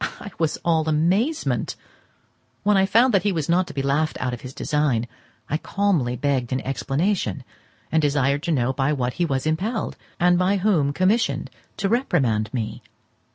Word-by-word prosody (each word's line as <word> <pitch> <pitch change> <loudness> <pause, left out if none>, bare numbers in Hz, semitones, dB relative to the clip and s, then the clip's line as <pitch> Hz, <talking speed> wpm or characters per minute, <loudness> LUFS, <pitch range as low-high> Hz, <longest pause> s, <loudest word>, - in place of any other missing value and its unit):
I 205 - -8
was 160 -2 0
all 160 -2 +2
amazement. 195 - +1 0.9
When 210 0 +3
I 195 0 +4
found 235 +5 +4
that 195 - +4
he 205 - +1
was 160 -6 -2
not 180 +2 +2
to - - -8
be 135 - -1
laughed 145 +3 0
out 125 -1 -2
of 120 - -6
his 130 - -8
design, 135 -5 0 0.4
I 150 - 0
calmly 170 -10 0
begged 130 -2 -1
an 130 - 0
explanation, 140 - -1 0.5
and 160 - +3
desired 140 -1 +1
to 170 - -2
know 130 -3 +1
by 135 +2 +1
what 125 -3 -1
he - - +4
was 135 -4 -1
impelled, 195 +9 -1 0.2
and 175 0 +4
by 190 +2 +2
whom 180 -8 +2
commissioned, 190 +9 +1 0.3
to 195 - 0
reprimand 135 - +1
me. 115 -1 -4
155 Hz, 175 wpm, -23 LUFS, 135-190 Hz, 0.9 s, I